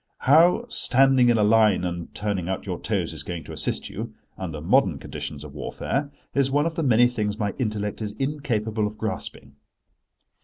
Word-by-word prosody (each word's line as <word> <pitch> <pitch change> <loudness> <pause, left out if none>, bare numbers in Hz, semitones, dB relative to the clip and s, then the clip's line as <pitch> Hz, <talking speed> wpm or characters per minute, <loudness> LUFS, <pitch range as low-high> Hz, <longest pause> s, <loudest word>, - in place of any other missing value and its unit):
How 165 - +5
standing 135 - +4
in 120 - +4
a 105 - +3
line 105 -3 +4
and 85 -1 -4
turning 100 -4 -2
out 95 - -3
your - - -4
toes - - -2
is - - -7
going 85 -2 -6
to - - -9
assist - - -2
you, - - -7 0.2
under 80 -5 -5
modern 95 - +3
conditions 70 +1 -6
of 75 -2 -10
warfare, 135 - -3 0.2
is 140 -1 +2
one 145 +2 +2
of 165 - -1
the 165 - -2
many 120 -4 +5
things 105 -4 -2
my 105 -3 -1
intellect 105 -3 -2
is 105 -1 -3
incapable 110 -5 -1
of 105 +1 -8
grasping. 110 -9 -5
110 Hz, 185 wpm, -24 LUFS, 95-135 Hz, 0.2 s, How